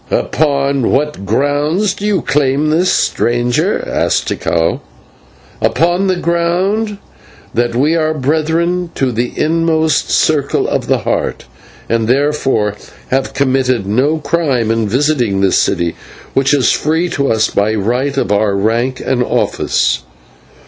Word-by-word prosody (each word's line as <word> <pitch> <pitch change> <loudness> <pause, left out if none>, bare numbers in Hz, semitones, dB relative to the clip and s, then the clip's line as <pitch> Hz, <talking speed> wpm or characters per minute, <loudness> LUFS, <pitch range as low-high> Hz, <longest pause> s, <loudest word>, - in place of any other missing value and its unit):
"Upon 140 -4 0
what 145 -7 -1
grounds 145 - +1
do 205 - -4
you 195 -7 0
claim 145 +1 +1
this, 175 +4 +2
stranger?" 120 +1 0
asked - - 0
Tikal. 85 -1 -1 0.8
"Upon 175 +4 +1
the 185 - +2
ground 180 +5 0 0.6
that 120 0 0
we 145 +6 +2
are 155 -1 +1
Brethren 160 +5 0
of 130 -2 +1
the 120 +2 -1
inmost 160 -1 +1
circle 150 -3 +1
of - - -2
the - - +1
Heart, - - -2 0.4
and 115 -1 0
therefore 135 -5 +1 0.4
have 135 +1 -1
committed 130 -5 +1
no 130 +10 +1
crime 140 -7 0
in 115 -1 0
visiting 125 -6 +1
this 95 -1 +3
city, 85 -1 0 0.4
which 135 0 +2
is 140 -4 +3
free 160 +3 0
to 140 -4 0
us 110 -1 +1
by 105 +2 +1
right 125 +7 -1
of 105 -7 0
our 105 -1 +2
rank 115 +6 0
and 130 -2 0
office." 125 - 0
140 Hz, 135 wpm, -14 LUFS, 120-160 Hz, 0.8 s, this